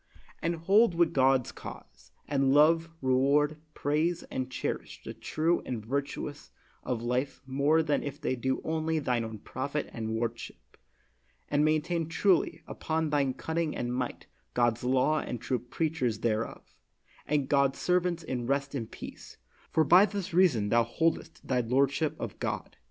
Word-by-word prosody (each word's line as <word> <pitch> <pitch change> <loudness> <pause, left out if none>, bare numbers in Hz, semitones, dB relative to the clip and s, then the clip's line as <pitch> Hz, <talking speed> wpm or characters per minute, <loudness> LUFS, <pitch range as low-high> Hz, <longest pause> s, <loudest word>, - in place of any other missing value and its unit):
And 170 +1 0
hold 190 +4 +4
with 170 -1 +3
God's 130 -2 +3
cause, - - -11 0.2
and 135 -2 +2
love, 165 +2 +5
reward, 140 +4 +3 0.2
praise, 155 +4 0
and 130 0 -3
cherish - - -4
the - - -6
true 165 +2 0
and 115 -4 -5
virtuous 140 +3 -4 0.3
of 120 -2 -3
life 125 +3 -1
more 140 +4 +2
than 150 -2 +1
if 145 - -6
they 130 - -1
do 130 +2 -1
only 160 0 -1
thine 125 -6 0
own 110 -1 -6
profit - - -4
and 110 -1 -3
worship; 115 - -5 0.7
and 145 - +2
maintain 155 +2 +1
truly, 185 +1 +2
upon 160 -1 -2
thy 140 -3 +2
cunning 160 +1 -2
and 120 0 -2
might, 125 -1 -3 0.3
God 120 -2 +2
's - - -13
law 130 +5 +2
and 120 - -4
true 125 +2 -1
preachers 125 -2 -2
thereof, 115 -1 -2 0.5
and 145 -2 +1
God's 140 -1 +2
servants 180 -1 +1
in 125 -4 -3
rest 140 +1 0
and 115 -6 -4
peace, - - -10 0.3
for 160 - +3
by 180 +7 +7
this 200 -4 -5
reason 150 - +4
thou 120 +2 +4
holdest 160 +8 -1
thy 125 -2 +2
lordship 140 +6 +1
of - - -6
God. - - -3
140 Hz, 155 wpm, -29 LUFS, 125-160 Hz, 0.7 s, by